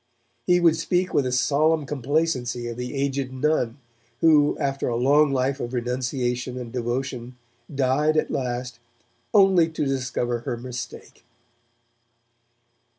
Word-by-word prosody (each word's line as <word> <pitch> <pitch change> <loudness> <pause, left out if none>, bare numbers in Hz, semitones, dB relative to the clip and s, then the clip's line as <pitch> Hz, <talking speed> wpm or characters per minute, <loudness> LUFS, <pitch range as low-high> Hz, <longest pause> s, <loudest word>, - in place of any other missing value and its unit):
He 180 0 +5
would 165 -2 +4
speak 180 +2 0
with 135 - +2
a - - -2
solemn 150 +4 +2
complacency 135 -3 -1
of 120 - -5
the 125 +3 -5
aged 135 -1 -1
nun, 130 -3 0 0.4
who, 150 -3 +4
after 135 0 -1
a 120 - -1
long 140 +4 +4
life 135 +1 0
of 120 0 -4
renunciation 125 0 -2
and 120 -2 -6
devotion, 125 0 -3 0.4
died 140 +4 +2
at - - 0
last, 125 -1 -3 0.5
'only 190 -5 +5
to 160 -2 -2
discover 125 -3 -1
her 120 0 -4
mistake'. 120 0 -8
130 Hz, 130 wpm, -24 LUFS, 125-150 Hz, 0.5 s, He